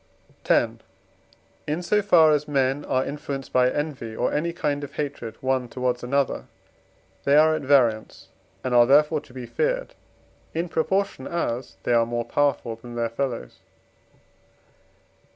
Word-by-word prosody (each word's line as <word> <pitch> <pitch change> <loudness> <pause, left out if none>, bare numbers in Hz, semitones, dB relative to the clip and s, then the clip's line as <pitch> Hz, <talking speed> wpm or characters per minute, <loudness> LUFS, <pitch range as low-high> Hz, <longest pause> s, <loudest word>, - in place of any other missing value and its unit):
X. - - +5 1.0
In 155 +4 -2
so 210 +4 +2
far 170 -6 +5
as 150 -1 +1
men 135 0 +1
are 130 0 0
influenced 140 -2 -6
by 125 0 +4
envy 135 -6 -4
or - - 0
any 165 +3 0
kind 145 -3 -2
of 145 0 -8
hatred, 135 -6 -4
one 130 -1 0
towards 125 -1 -1
another, 140 +2 0 0.8
they 140 - +3
are 155 +1 +6
at 155 - -2
variance, 125 -6 +1 0.3
and 130 - -2
are 120 -1 +6
therefore 150 +2 +4
to 150 - -19
be 125 -1 -7
feared - - -1 0.6
in 170 +2 -1
proportion, 190 -4 -1
as 130 -7 -3
they - - +1
are 115 -1 +3
more 120 0 -2
powerful 140 -5 0
than 120 +1 -10
their 115 -1 -1
fellows. 115 - -4
140 Hz, 150 wpm, -24 LUFS, 125-150 Hz, 1.0 s, are